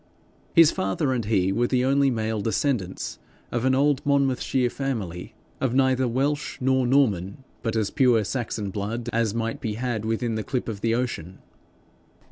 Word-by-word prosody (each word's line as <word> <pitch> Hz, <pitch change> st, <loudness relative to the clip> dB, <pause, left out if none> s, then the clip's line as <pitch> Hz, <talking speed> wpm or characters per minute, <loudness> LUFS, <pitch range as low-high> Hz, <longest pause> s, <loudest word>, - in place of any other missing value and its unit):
His 165 Hz, -2 st, +7 dB
father 95 Hz, +8 st, -1 dB
and 120 Hz, -4 st, -2 dB
he 95 Hz, -3 st, +2 dB
were 120 Hz, +5 st, +1 dB
the 125 Hz, 0 st, +1 dB
only 140 Hz, +1 st, +3 dB
male 110 Hz, -3 st, -1 dB
descendants 110 Hz, -2 st, -2 dB, 0.3 s
of 120 Hz, +1 st, -1 dB
an 130 Hz, 0 st, +3 dB
old 140 Hz, 0 st, +2 dB
Monmouthshire 135 Hz, -3 st, +1 dB
family, 110 Hz, -12 st, -4 dB, 0.2 s
of 130 Hz, -2 st, 0 dB
neither 130 Hz, -1 st, +3 dB
Welsh 145 Hz, +4 st, -1 dB
nor 130 Hz, -1 st, +2 dB
Norman, 110 Hz, -5 st, +1 dB, 0.2 s
but 115 Hz, -1 st, -2 dB
as 110 Hz, -3 st, 0 dB
pure 125 Hz, -5 st, +3 dB
Saxon 110 Hz, -3 st, -3 dB
blood 115 Hz, +4 st, -3 dB
as 115 Hz, -2 st, +1 dB
might 115 Hz, 0 st, -2 dB
be 110 Hz, -2 st, -2 dB
had 120 Hz, -2 st, -2 dB
within 115 Hz, +1 st, -1 dB
the 110 Hz, 0 st, -2 dB
clip 130 Hz, -2 st, -3 dB
of 105 Hz, -3 st, -5 dB
the 115 Hz, 0 st, +1 dB
ocean. 95 Hz, -8 st, -3 dB
120 Hz, 165 wpm, -25 LUFS, 110-130 Hz, 0.3 s, His